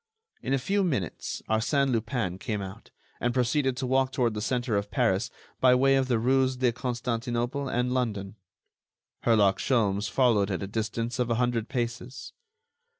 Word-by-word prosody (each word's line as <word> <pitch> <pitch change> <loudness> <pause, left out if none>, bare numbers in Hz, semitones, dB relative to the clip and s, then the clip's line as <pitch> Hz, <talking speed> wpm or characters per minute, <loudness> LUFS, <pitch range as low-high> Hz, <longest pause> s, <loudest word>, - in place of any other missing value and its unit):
In - - -4
a 135 - +3
few 195 +10 0
minutes 125 - -3
Arsène 135 +5 +1
Lupin 115 -5 -1
came 105 0 -3
out, 95 -1 -8 0.3
and 120 0 -1
proceeded 130 +1 +1
to 130 - -2
walk 130 +1 +2
toward 120 -4 +1
the 105 - -4
center 120 -1 -1
of 100 0 -1
Paris 110 -5 +1 0.3
by 125 -1 +6
way 135 +2 +4
of 135 -1 +2
the 120 -3 +2
rues 130 +2 +2
de 125 -1 +2
Constantinople 125 +2 -2
and 125 +1 0
London. 105 -6 -2 0.9
Herlock 105 -4 +4
Sholmes 105 -5 +1
followed 115 -6 +3
at 95 0 -2
a - - -2
distance 115 +3 -3
of 125 -1 +1
a 115 - +2
hundred 120 -1 0
paces. 125 0 -4
120 Hz, 165 wpm, -27 LUFS, 110-130 Hz, 0.9 s, by